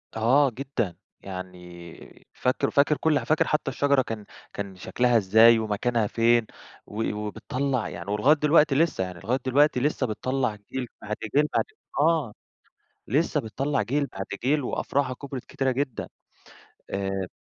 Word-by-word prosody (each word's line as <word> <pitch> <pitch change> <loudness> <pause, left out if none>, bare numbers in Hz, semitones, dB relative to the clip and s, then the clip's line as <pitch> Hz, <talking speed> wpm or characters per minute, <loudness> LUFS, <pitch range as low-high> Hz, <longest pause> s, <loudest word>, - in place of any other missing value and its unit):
آه، 130 +6 +4
جدًا 120 -7 -3 0.3
يعني 90 -2 -10
فاكر 125 - 0
فاكر 145 +1 +3
كُلّ 155 -2 +2
حا - - -7
فاكر 155 - +2
حتى 150 -3 0
الشجرة 140 +1 +2
كان 110 -4 -6 0.3
كان 100 -1 -5
شكلها 120 +6 +1
إزاي 110 +3 +6
ومكانها 110 +1 0
فين، 115 +1 +3 0.4
و 110 +1 -3
وبتطلّع 125 +4 -2
يعني 100 - -6
ولغاية 120 +9 +4
دلوقتي 150 -1 +4
لسه 150 - +2
يعني 90 -1 -7
لغاية 120 +7 -1
دلوقتي 145 +1 +3
لسه 140 -1 0
بتطلّع 125 +1 -1 0.2
جيل 130 -2 -3
بعد 105 +1 -4 0.2
جيل 150 +1 +5
بعد - - +2 0.3
آه، 155 -7 +2 0.7
لسه 150 +5 +1
بتطلّع 135 +5 -1
جيل 140 +4 0
بعد 95 -5 -6 0.2
جيل 145 +3 +2
وأفرُعها 130 +1 -1
كُبرت 135 -1 -7
كتيرة 135 -1 -1
جدًا 130 -2 -3 0.8
آآ 95 -1 -2
125 Hz, 145 wpm, -26 LUFS, 105-140 Hz, 0.8 s, إزاي